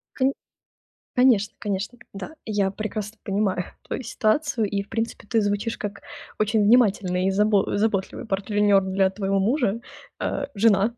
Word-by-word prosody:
Конь 270 0 +2 0.8
конечно, 240 -5 +4
конечно. 205 +3 -3 0.2
Да, 250 +11 -7
я 205 -3 +1
прекрасно 215 +1 -5
понимаю 195 -3 0 0.2
твою 265 - -4
ситуацию. 230 +1 +1
И, 200 0 -1
в 200 - -17
принципе, 225 -1 -3
ты 225 0 +2
звучишь 205 +2 -1
как 200 -1 -5 0.4
очень 215 0 +2
внимательный 200 -5 +3
и - - +3
забо 205 0 +2
заботливый 205 -1 -1
партнёр 200 0 +2
для 190 0 +2
твоего 195 0 -1
мужа, 230 0 +1 0.4
э, - - -1
жена. 210 +1 +3
205 Hz, 140 wpm, -24 LUFS, 195-225 Hz, 0.8 s, конечно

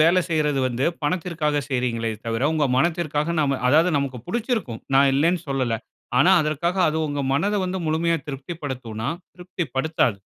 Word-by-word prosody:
வேல 170 +4 +5
செய்றது 150 -4 +1
வந்து 125 +1 -1 0.2
பணத்திற்காக 155 -2 0
செய்கிறீங்ளே 120 -3 -1
தவிர, 115 +1 -2
உங்க 155 -2 +1
மனத்திற்காக 160 +1 0
நம்ம 140 -3 +1
அதாவது 160 +6 +5
நமக்கு 135 -3 -2
புடிச்சிருக்கும். 220 - -2
நான் 135 0 +6
இல்லன்னு 165 +5 +2
சொல்லல. 130 -5 0 0.4
ஆனா, 175 - +6
அதற்காக 155 +4 -1
அது 155 - -1
உங்க 145 -1 -2
மனத 200 +9 +1
வந்து 185 +1 -2
முழுமையா 165 +2 +1
திருப்தி 140 +4 -6
படுத்துமானா? 120 -4 -4 0.3
திருப்தி 180 0 -5
படுத்தாது. 135 -7 +1
150 Hz, 150 wpm, -23 LUFS, 135-170 Hz, 0.4 s, நான்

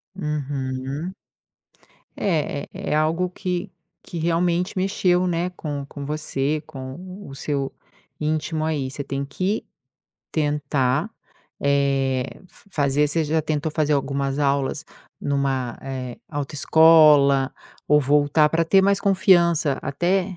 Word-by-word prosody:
Uhum. 140 -1 -3 1.1
É 155 -6 0
é - - -9
é - - -2
algo 165 +4 +1
que 180 -1 -4 0.3
que 170 - -7
realmente 170 +3 0
mexeu, 185 -1 +2
né, 175 +1 -1
com 145 -5 -5
com 140 0 -8
você, 150 0 -1
com 130 -2 -8 0.3
o 135 - -9
seu 140 -1 -2 0.5
íntimo 155 +1 -1
aí. 145 -4 -1
Você 140 +2 -5
tem 140 0 -3
que 185 +9 -2 0.7
tentar, 145 - 0 0.5
eh, 135 -2 +1 0.2
f 200 - -23
fazer 145 -2 +2
você 160 +2 +1
já 155 +2 +1
tentou 155 0 -2
fazer 155 -1 +1
algumas 140 0 -1
aulas 140 +2 0 0.4
numa, 135 -3 -1
eh, 130 -2 -5
autoescola 145 -1 +5 0.4
ou 150 0 +5
voltar 145 +2 +3
pra 165 +2 +1
ter 190 +4 +5
mais 200 0 +3
confiança 170 -7 +3
até 180 +6 0
150 Hz, 120 wpm, -23 LUFS, 140-165 Hz, 1.1 s, autoescola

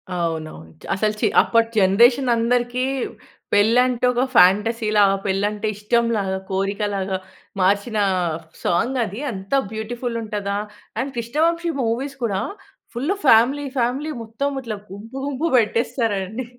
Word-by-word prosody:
అవునవును. 160 - -4 0.2
అసలు 215 +2 0
చి - - +4
అప్పటి 230 -1 +2
జనరేషన్ 240 +7 +4
అందరికీ 245 +2 0 0.7
పెళ్ళంటే 245 +4 +3
ఒక 245 +1 +1
ఫాంటసీలా, 210 +3 +4 0.2
పెళ్ళంటే 205 +2 -1
ఇష్టంలాగా, 210 -2 0
కోరికలాగా 195 0 -1 0.4
మార్చిన 200 +4 +1 0.7
సాంగ్ 235 +10 +1
అది. 205 +2 -7
అంత 195 -2 -8 0.2
బ్యూటిఫుల్ 230 +2 -4
ఉంటదా! 205 -2 -3 0.4
అండ్ 270 +3 -2
కృష్ణవంశి 325 +8 0
మూవీస్ 255 +5 -2
కూడా 200 -4 0 0.5
ఫుల్ 280 +10 0
ఫ్యామిలీ, 260 +4 +5
ఫ్యామిలీ 260 +6 0
మొత్తం 270 +5 -3
ఇట్లా 225 -4 -5
గుంపు, 220 +6 -9
గుంపు 285 +4 -1
పెట్టేస్తారండి. 225 -1 0
225 Hz, 110 wpm, -21 LUFS, 200-245 Hz, 0.7 s, ఫ్యామిలీ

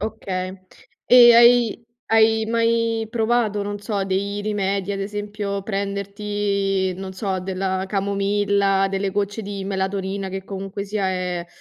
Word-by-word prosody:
Okay. 190 -3 -4 0.5
E 240 -1 +8
hai 235 -1 +5 0.3
hai 220 0 +4
mai 230 -1 +1
provato, 225 -2 +1
non 205 0 -4
so, 205 -1 -2
dei 200 +2 -2
rimedi, 200 -2 -1
ad 195 - -3
esempio, 205 0 -4
prenderti, 200 -1 -2
non 190 +1 -7
so, 190 -1 -2
della 190 0 -2
camomilla, 200 0 +1
delle 195 0 -1
gocce 205 +2 -2
di 200 -1 -5
melatonina, 195 0 -2
che 190 0 -5
comunque 195 +1 -5
sia 200 -1 -1
è 180 -2 -3
200 Hz, 130 wpm, -22 LUFS, 195-210 Hz, 0.5 s, E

